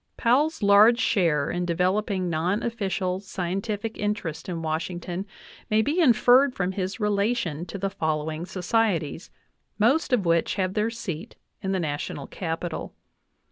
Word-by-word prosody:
Powell's 275 +4 +2
large 205 +4 +7
share 170 - +2
in 175 0 -1
developing 185 +2 0
non 175 +5 0
official 190 -5 -1
scientific 195 +3 -4
in 210 0 +1
terests 160 -3 -6
in 165 -2 -4
Washington 175 +4 -3 0.4
may 215 +1 +3
be 295 +8 0
inferred 255 0 +5
from 180 -1 -1
his 190 +1 -3
relation 205 -5 0
to - - -6
the 195 0 -2
following 160 -2 -2
societies, 185 -4 -1 0.5
most 270 +9 +2
of 230 -7 +2
which 170 -1 +2
have 185 -2 -1
their 215 +2 +1
seat 215 -4 -6 0.3
in 190 - -2
the 190 - 0
Na 150 -4 -1
tional 140 -1 -6
Capital. 165 -1 -4
190 Hz, 145 wpm, -25 LUFS, 170-220 Hz, 0.5 s, large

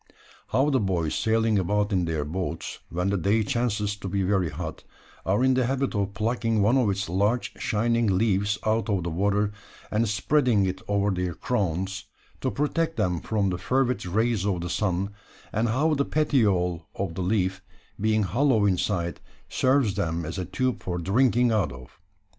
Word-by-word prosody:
How 135 +6 +2
the 130 - +3
boys 90 -7 0
sailing 110 -1 +2
about 105 +3 0
in 90 -2 +2
their 80 -3 -2
boats 85 +1 -4
when 90 +3 -1
the 100 - +1
day 105 +5 +2
chances 105 -4 -1
to 100 - -6
be 95 +1 0
very 95 -3 +1
hot, 80 +2 -6 0.4
are 100 +6 +2
in 130 0 +4
the 130 -1 +2
habit 135 +1 -1
of 100 -1 -2
plucking 115 0 0
one 105 +5 +4
of 125 -6 +3
its 95 0 -1
large 100 +8 0
shining 115 +2 +1
leaves 100 0 +1
out 110 +1 +1
of 95 -4 +1
the 85 - -3
water, 100 +4 +1 0.4
and 110 +1 +1
spreading 115 0 +2
it 95 0 -3
over 100 0 +1
their 90 -2 -2
crowns, 95 -3 -2 0.3
to 130 - -1
protect 160 +3 -1
them 90 -6 +1
from 100 -4 0
the 90 - -3
fervid 125 +1 0
rays 110 +2 +1
of 95 -4 0
the 90 0 -4
sun; 95 0 0 0.4
and 110 +2 +1
how 150 +8 +2
the 140 -1 +2
petiole 100 - +1
of 95 -4 -3
the 95 - -4
leaf, 95 -1 0 0.4
being 110 +1 +2
hollow 115 +1 +2
inside, 90 -2 0 0.3
serves 130 -5 +2
them 85 -1 -2
as 85 +5 -4
a 90 - -2
tube 130 +7 -1
for 90 -1 -3
drinking 120 +6 +2
out 100 -10 +1
of. 65 +4 -13
105 Hz, 180 wpm, -26 LUFS, 90-115 Hz, 0.4 s, in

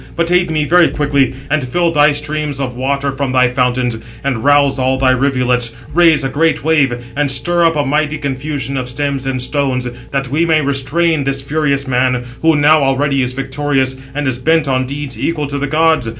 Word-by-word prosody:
But 170 0 0
aid 180 -1 +2
me 155 -2 0
very 175 +2 +4
quickly, 140 -3 0
and 155 -1 0
fill 170 +7 0
thy 150 -1 +4
streams 150 -1 -2
of 130 -3 -3
water 140 +2 -1
from 135 -1 -3
thy 125 -1 +3
fountains, 125 -1 0 0.3
and 130 -5 -2
rouse 145 -1 +3
all 130 +1 +1
thy 130 -1 +3
rivulets, 125 -3 +1 0.2
raise 165 -3 +4
a 135 - -1
great 160 +4 0
wave, 135 -6 0
and 145 0 0
stir 170 +7 +3
up 165 -1 +2
a 145 -1 0
mighty 150 +2 0
confusion 140 0 -4
of 125 -1 -4
stems 140 0 -3
and 130 -1 -2
stones, 125 -1 -1 0.2
that 135 -2 -3
we 150 +5 +1
may 160 -2 +2
restrain 145 +3 0
this 135 0 -2
furious 140 -1 -1
man, 125 -1 0 0.2
who 160 -1 +3
now 150 +1 +4
already 135 0 +1
is 125 0 -2
victorious, 135 0 -1 0.2
and 145 0 -2
is 130 -2 -1
bent 160 +2 +1
on 130 -1 0
deeds 140 -4 -5
equal 150 +3 -1
to 140 0 -4
the 145 - -2
gods. 160 -4 +1
140 Hz, 200 wpm, -15 LUFS, 130-150 Hz, 0.3 s, very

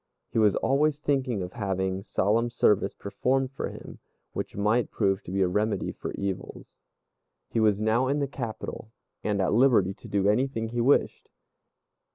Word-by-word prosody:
He 115 - +1
was 105 -3 +4
always 145 +2 +2
thinking 130 -8 0
of 90 - -7
having 95 -3 -2
solemn 110 +4 +1
service 105 -4 +2
performed 130 +6 -1
for 135 - -4
him, - - -10 0.3
which - - -4
might 105 +4 +1
prove 95 -2 0
to - - -9
be 95 0 +2
a - - +2
remedy 105 +4 0
for - - -6
evils. 100 -2 -4 0.8
He - - -1
was 105 -2 +3
now 110 +4 +2
in 140 +2 +1
the 140 -1 0
capital, 115 -3 -6 0.3
and 105 -1 0
at 95 0 +1
liberty 115 -6 +4
to - - -14
do 100 -1 +1
anything 115 +1 +1
he 120 +1 -1
wished. 135 +4 +2
110 Hz, 170 wpm, -27 LUFS, 100-125 Hz, 0.8 s, was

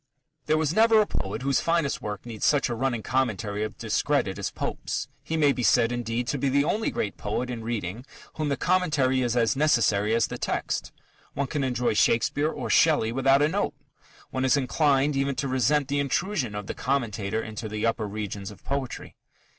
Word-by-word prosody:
_ - - -45
There 155 - +3
was 155 0 0
never 225 +2 +5
a 210 - +4
poet 105 - -4
whose 140 -1 +2
finest 165 -4 0
work 105 0 -5
needs 115 -3 -7
such 145 -3 +3
a - - -1
running 120 -2 -1
commentary 110 -5 -1
of 110 -1 -5
discredit - - 0
as - - -2
Pope's. - - -4
He 160 - -3
may 145 -2 +4
be 130 - -3
said, 115 0 +4
indeed, 120 0 -2
to 145 - -1
be 140 - +1
the 140 +2 +3
only 215 +8 0
great 100 - -3
poet 120 +4 -3
in 115 -2 -5
reading 110 -1 -4 0.3
whom 155 -2 -2
the 140 - 0
commentary 150 -8 +2
is 120 -1 0
as 115 0 +2
necessary 115 -7 +2
as 115 - +3
the - - -6
text. - - -2 0.4
One 140 - 0
can 140 +1 -2
enjoy 125 -3 0
Shakespeare 120 +7 +2
or - - -5
Shelley 150 -9 +4
without 135 +3 +3
a - - +4
note: 190 -2 -1 0.6
one 130 - -1
is 130 +2 +4
inclined 140 +1 +2
even 135 0 0
to 135 - -2
resent 130 +2 +2
the 140 +1 0
intrusion 140 - -1
of 105 -1 -4
the - - -4
commentator 110 -5 -1
into 110 0 -6
the 110 +1 -2
upper 115 -1 0
regions 100 -1 -5
of 105 -3 -14
poetry. 135 -2 -4
130 Hz, 200 wpm, -26 LUFS, 110-145 Hz, 0.6 s, never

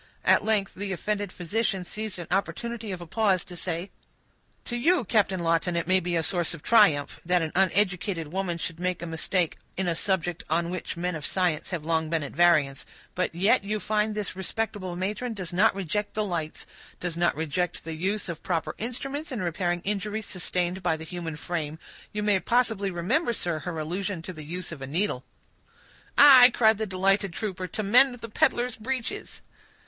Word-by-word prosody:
At - - +5
length 210 -3 +1
the 200 +1 -5
offended 205 +1 -2
physician 190 +1 -1
seized 215 +1 -4
an 175 - -6
opportunity 225 +3 -2
of 180 -2 -5
a - - -7
pause 195 0 +1
to 180 - -10
say,— 175 +2 -3 0.7
"To 240 - -4
you, 290 +5 +3
Captain 195 -3 +1
Lawton, 165 +1 +1
it 170 - 0
may 185 0 +5
be 175 -1 -2
a 165 - +1
source 175 -1 0
of 150 - -14
triumph, 200 -11 +4
that 180 0 +2
an 160 - -3
uneducated 185 -3 +1
woman 185 -3 -1
should 165 0 -5
make 180 -1 -2
a - - -3
mistake 165 +1 -1 0.2
in 190 -1 0
a 170 - +1
subject 175 -2 -1
on 170 +2 0
which 180 -2 -4
men 180 +1 -1
of 155 - -6
science 175 -2 0
have 170 -5 -4
long 160 -1 0
been 165 -2 0
at 145 - -6
variance; 155 -6 +3 0.3
but 180 -2 -1
yet 195 +3 +3
you 210 +2 -2
find 210 0 0
this 210 -3 -3
respectable 190 -1 -3
matron 210 +6 -3
does 185 -3 -5
not 190 +3 +4
reject 200 +2 -2
the 215 0 0
lights—does 170 0 -5
not 175 +1 +2
reject 160 +3 -2
the 165 - -5
use 195 +7 -2
of 170 -2 -5
proper 165 -3 -2
instruments 275 +7 -3
in 250 - -3
repairing 175 0 -1
injuries 210 +2 -2
sustained 180 0 -1
by 175 -3 +1
the 160 - -8
human 165 -1 -5
frame. 155 -1 -4 0.3
You 210 0 -3
may 205 -2 +3
possibly 225 -3 +1
remember, 190 - 0
sir, 170 -7 -2
her 175 0 -5
allusion 175 +3 -3
to 185 - -6
the 155 - -9
use 175 +4 -5
of 165 - -7
the 135 - -6
needle." 155 -3 -1 0.9
"Aye," 265 -3 +10
cried 220 -2 +4
the 220 - -1
delighted 195 0 +1
trooper, 185 -3 -4
"to 215 +5 -3
mend 245 +5 +6
the 230 - -6
peddler's 240 +3 +1
breeches." 245 +1 -4
185 Hz, 190 wpm, -27 LUFS, 170-210 Hz, 0.9 s, Aye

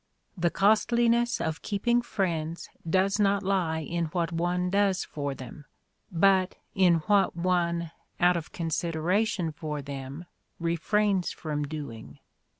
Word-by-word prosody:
The 175 -2 +1
costliness 235 +4 +3
of 160 0 -2
keeping 235 +4 +1
friends 170 -7 -2 0.2
does 190 +4 +2
not 200 0 +2
lie 180 -5 0
in 170 +2 -2
what 165 +1 -2
one 175 +2 0
does 200 -1 +2
for 140 -2 -4
them, 130 +3 -10 0.5
but 185 +1 +3 0.2
in 185 -3 +5
what 200 -4 +3
one, 170 -1 0 0.3
out 180 0 +5
of 165 -2 -4
consider 165 0 -2
ation 200 -5 +1
for 150 -2 -5
them, 140 +3 -7 0.3
refrains 185 +3 +1
from 150 -3 -3
doing. 140 -7 -7
175 Hz, 130 wpm, -28 LUFS, 160-195 Hz, 0.5 s, in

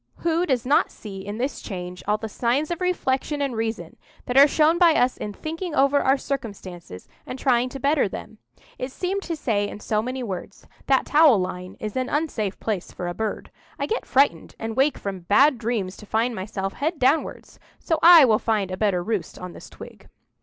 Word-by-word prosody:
Who 340 +2 +1
does 250 -4 0
not 280 +4 +3
see 195 -3 -9
in 205 +2 -6
this 265 +4 -3
change 180 -3 -7
all 210 +1 +2
the 220 - -5
signs 250 +8 -1
of 345 - -3
reflection 295 -5 -1
and 275 -4 -1
reason 225 0 -4 0.3
that 250 - -3
are 280 +2 +9
shown 315 +3 +3
by 340 -3 +6
us 250 -2 +2
in 210 - -5
thinking 325 - -5
over 275 +1 +4
our 270 +1 +3
circumstances, 190 - -7 0.2
and 255 - -5
trying 250 -2 +2
to 270 - -8
better 280 -4 +2
them? 215 +3 -9 0.4
It 255 +1 -4
seemed 380 +7 -2
to 340 -3 -4
say 215 -9 0
in - - -8
so 215 0 -1
many 255 +2 -4
words: 195 -2 -7 0.2
"That 270 -1 +3
towel 295 -6 +5
line 180 -1 -5
is 215 -1 -5
an 255 -1 -1
unsafe 245 -10 -2
place 210 -5 -3
for 180 - -5
a 175 - -3
bird; 220 +2 -4 0.3
I - - -1
get 450 - -3
frightened, 265 - +2
and 225 0 -5
wake 270 +2 +2
from 195 -2 -5
bad 245 - +4
dreams 215 -5 -2
to 210 - -13
find 230 +3 0
myself 195 -1 -4
head 315 +4 -2
downwards; 280 +4 0 0.2
so 325 -2 -1
I 335 -3 +9
will 220 -3 +3
find 210 -4 -1
a 185 - -4
better 190 -4 +1
roost 215 -2 -3
on 180 -1 -8
this - - -12
twig." - - -13
245 Hz, 205 wpm, -24 LUFS, 205-285 Hz, 0.4 s, are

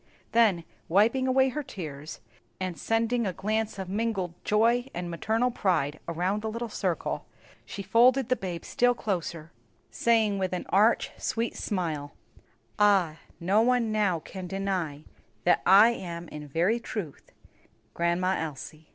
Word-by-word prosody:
Then, 215 -7 +3 0.3
wiping 230 +9 +3
away 265 +1 +4
her 300 +4 -3
tears, 155 - -8 0.4
and 185 -2 -3
sending 230 +3 0
a 185 - -2
glance 215 +3 -2
of 190 -1 -5
mingled 195 -3 -2
joy 235 +4 +2
and 175 0 -4
maternal 225 +8 0
pride 155 -9 0
around 180 +5 -1
the 220 - -3
little 230 +1 -4
circle, - - -2 0.4
she 200 - -6
folded 240 +6 +4
the 255 - +2
babe 180 -6 -5
still 245 0 +2
closer, 170 -6 -4 0.4
saying, 220 -4 +2
with 185 -1 -1
an 180 - -3
arch, 210 +5 +3
sweet 230 +1 -2
smile, 160 -8 -3 0.7
"Ah, 195 -6 +3 0.2
no 195 +5 +3
one 240 -2 +2
now 205 -5 +2
can 185 +3 -8
deny 185 -6 -3 0.4
that - - +3
I 200 +5 +8
am 175 -6 -6
in 150 -1 -8
very 175 - +1
truth 200 - -7 0.6
Grandma 175 +2 +1
Elsie!" 155 0 -7
195 Hz, 145 wpm, -28 LUFS, 170-225 Hz, 0.7 s, I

